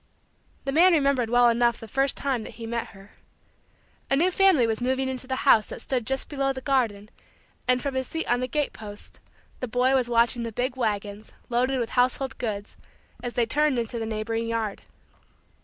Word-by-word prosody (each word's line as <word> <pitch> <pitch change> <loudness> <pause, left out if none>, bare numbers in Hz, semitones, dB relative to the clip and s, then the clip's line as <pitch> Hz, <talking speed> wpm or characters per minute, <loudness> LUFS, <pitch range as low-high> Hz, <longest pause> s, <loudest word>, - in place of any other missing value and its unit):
The 275 - -1
man 345 +5 +6
remembered 275 -6 +2
well 245 0 +5
enough 235 0 +2
the 225 - -9
first 270 +5 0
time 270 -4 -1
that - - -9
he 230 - -7
met 235 0 -3
her. 195 0 -16 1.0
A 275 - +3
new 345 +6 +3
family 370 -9 +4
was 225 0 -1
moving 260 +1 0
into 260 0 -4
the 260 - -1
house 220 -6 +6
that - - -8
stood 250 -4 -2
just 265 0 -1
below 275 -2 -1
the 265 - -5
garden 235 -7 0 0.6
and, 250 0 +2
from 280 - -2
his 260 -1 -2
seat 325 - -3
on 245 +1 +1
the 255 - -2
gate 295 +3 -1
post, 205 -1 -9 0.4
the 255 - -3
boy 250 +3 +2
was 255 -3 +2
watching 235 +1 +3
the 230 -1 -4
big 250 +3 -2
wagons, 210 -3 -3 0.2
loaded 250 +2 +1
with 235 -2 -2
household 255 +2 0
goods, 205 -3 -4 0.5
as 245 -1 -4
they 240 - +2
turned 295 +3 +1
into 235 0 -2
the 225 - -3
neighboring 225 +1 -2
yard. 225 -3 -2
245 Hz, 200 wpm, -26 LUFS, 225-265 Hz, 1.0 s, man